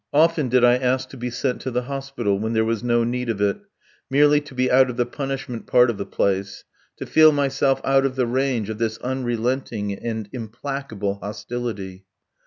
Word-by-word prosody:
Often 155 -2 +3
did 125 0 +3
I 120 0 +6
ask 130 0 0
to - - -11
be 125 0 -3
sent 125 +1 -2
to - - -3
the 125 0 -1
hospital, 135 -6 -2
when 110 +2 -2
there 110 0 +2
was 115 -1 -1
no 120 -1 +2
need 125 +1 -2
of 110 -3 -1
it, 100 0 +1 0.5
merely 145 +2 +4
to 145 -2 -13
be 130 0 +1
out 130 0 +5
of 125 - -5
the 120 - +2
punishment 135 -2 -5
part 125 -1 +5
of 105 - -8
the 100 - -4
place, 95 0 -1 0.3
to - - -6
feel 155 0 +6
myself 135 -2 +1
out 135 0 +3
of 135 -1 -1
the 130 -2 +1
range 120 -3 0
of 110 - -7
this 110 -1 -1
unrelenting 120 -4 -2
and 110 +1 -4
implacable 115 -4 -4
hostility. 105 -3 -5
125 Hz, 195 wpm, -22 LUFS, 110-135 Hz, 0.5 s, I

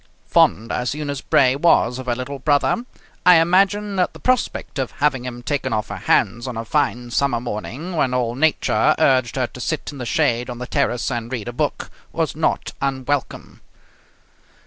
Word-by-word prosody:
Fond 110 +3 +2
as 125 +2 -1
Eunice 145 -3 -4
Bray 130 -1 +3
was 135 -5 +3
of 130 - -8
her 120 - +1
little 135 +3 -5
brother, 145 - +1 0.4
I 180 -1 +8
imagine 195 +4 +2
that 180 - +1
the - - -12
prospect 250 - -1
of 130 - -2
having 140 -4 0
him 120 -1 -7
taken 140 -3 -2
off 105 -1 -2
her 100 - -5
hands 115 +3 +1
on 125 -3 -5
a 115 - -4
fine 125 -3 -1
summer 135 -2 +1
morning, 125 - -5
when 140 -5 +1
all 125 -2 0
nature 150 +4 +2
urged 130 -4 +2
her 130 -2 +1
to 125 - -10
sit 155 +4 -3
in 140 - -10
the 125 - -4
shade 120 +3 +1
on 120 - -5
the 125 - -5
terrace 125 0 0
and 120 0 -4
read 120 -5 -4
a 120 - -4
book, - - -2 0.2
was - - -2
not - - -1
unwelcome. 135 0 -3
130 Hz, 190 wpm, -21 LUFS, 120-145 Hz, 0.4 s, I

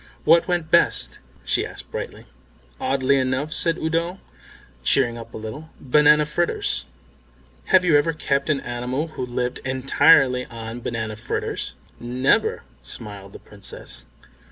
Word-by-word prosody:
"What 165 +1 +5
went 175 -3 -1
best?" - - +3 0.3
she - - +1
asked - - -8
brightly. - - -6 0.5
"Oddly 135 +1 +1
enough," 130 +3 -1
said 165 0 +5
Udo, 165 +3 -1 0.6
cheering 120 - +3
up 115 0 -9
a - - -8
little, 110 +9 -8
"banana 150 +3 +4
fritters. 170 +3 0 0.8
Have 185 -1 +4
you 165 -4 +4
ever 165 +3 +1
kept 140 -3 -1
any 145 -3 0
animal 125 +6 -3
who 140 - -6
lived 125 0 -3
entirely 130 0 +3
on 115 0 -7
banana 110 -2 -3
fritters?" 115 - -4 0.2
"Never," 125 +3 +1 0.2
smiled 100 - -5
the - - -8
Princess. 100 -10 -8
130 Hz, 130 wpm, -23 LUFS, 120-155 Hz, 0.8 s, What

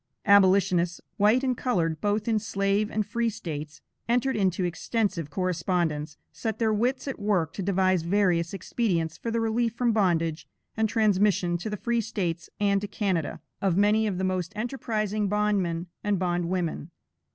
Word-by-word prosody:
Abolitionists, 190 -3 +4 0.2
white 215 +6 +4
and 255 -2 +1
colored, 165 - -1
both 210 +1 0
in 220 -2 +2
slave 200 0 0
and 215 -1 -1
free 235 +2 0
States, 155 -7 -6 0.3
entered 250 +3 +2
into 190 -2 +1
extensive 175 -2 -1
correspondence, 165 -3 -1
set 225 -2 -3
their 220 -2 +1
wits 250 +6 0
at 270 - -4
work 195 -6 0
to - - -5
devise 185 -1 +2
various 175 -1 +1
expedients 180 -4 -1
for 230 - -4
the 230 0 0
relief 225 0 0
from 240 -1 +2
bondage 170 -7 +1 0.3
and 220 -1 +1
transmission 205 -5 +2
to 195 - -4
the 210 - -3
free 235 +3 0
States 180 -7 -3
and 200 -1 +2
to 205 - -3
Canada, 190 -7 -2 0.2
of 190 -3 +1
many 210 +2 +3
of 195 -3 -2
the 190 - -2
most 185 -1 -1
enterprising 215 -3 -2
bondmen 195 -5 0 0.2
and 205 -1 +1
bondwomen. 175 -2 -1
200 Hz, 160 wpm, -27 LUFS, 175-220 Hz, 0.3 s, Abolitionists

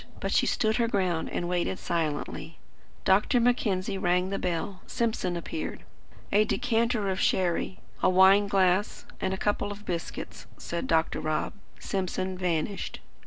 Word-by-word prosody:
But - - -2
she - - +3
stood 220 -1 +1
her 235 -1 +2
ground, 180 -7 0
and 175 - -2
waited 180 +1 0
silently. 160 0 -3 0.5
Dr. 205 +6 +4
Mackenzie 205 -5 +1
rang 180 +1 +2
the 195 - -1
bell. 180 +2 -2
Simpson 220 -6 -1
appeared. 315 - -5 0.5
"A 210 +1 +5
decanter 230 -2 +1
of 190 - -2
sherry, 185 0 +1 0.2
a - - +4
wine 190 +2 +6
glass, 190 0 +2 0.2
and 190 - 0
a 190 - -1
couple 205 0 0
of 205 +1 -9
biscuits," 170 -2 -5
said 170 0 -4
Dr. 160 -1 +2
Rob. 155 0 -1 0.3
Simpson 185 -1 -2
vanished. 180 +1 -2
190 Hz, 145 wpm, -28 LUFS, 175-205 Hz, 0.5 s, wine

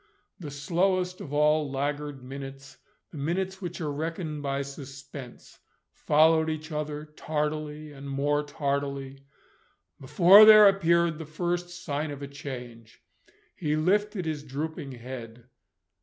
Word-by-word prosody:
The 160 -5 -7
slowest 180 +5 0
of 140 - -8
all 150 0 +2
laggard 145 0 -3
minutes, 135 +1 -9 0.3
the 155 - -8
minutes 190 +6 -2
which 175 -1 -5
are 150 -2 -2
reckoned 160 0 -4
by 140 -1 -2
suspense, 140 -2 -10 0.3
followed 160 +1 +3
each 155 +1 -5
other 150 0 -4
tardily 150 0 -4
and 140 -1 -9
more 145 +2 +1
tardily, 140 -2 -3 0.8
before 180 +9 +7
there 215 -1 +10
appeared 170 -4 +2
the 160 - -6
first 175 +3 -2
sign 155 -4 -4
of 145 -1 -7
a - - -5
change. 125 -5 -9 0.5
He 150 -2 -1
lifted 200 +4 +1
his 155 -2 -3
drooping 145 0 -5
head. 120 -1 -9
150 Hz, 125 wpm, -27 LUFS, 140-165 Hz, 0.8 s, there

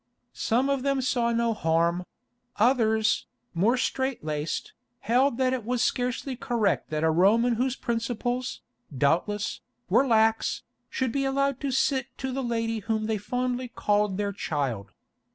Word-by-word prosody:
Some 250 +4 +1
of 275 -1 0
them 275 0 +1
saw 245 -2 +1
no 235 0 +1
harm; 170 -1 +1 0.5
others, 220 -2 +2 0.3
more 210 +9 +2
strait 260 - -1
laced, 155 0 -3 0.3
held 250 +2 +2
that 260 -1 +2
it 255 -3 -2
was 245 +2 0
scarcely 250 +2 -1
correct 235 -4 0
that 155 0 -2
a 160 - +4
Roman 215 +9 +4
whose 255 +3 0
principles, 245 +1 -2 0.4
doubtless, 175 +9 0 0.3
were 275 - +4
lax, 225 -1 +2 0.3
should 260 -3 -1
be 275 +3 0
allowed 275 0 0
to 280 - -1
sit 265 0 +1
to 265 -1 -3
the 270 +1 -2
lady 230 -2 -1
whom 215 +1 -1
they 220 -1 -1
fondly 250 +3 -2
called 205 -4 0
their 205 -1 -1
child. 130 - -3
235 Hz, 150 wpm, -27 LUFS, 205-255 Hz, 0.5 s, a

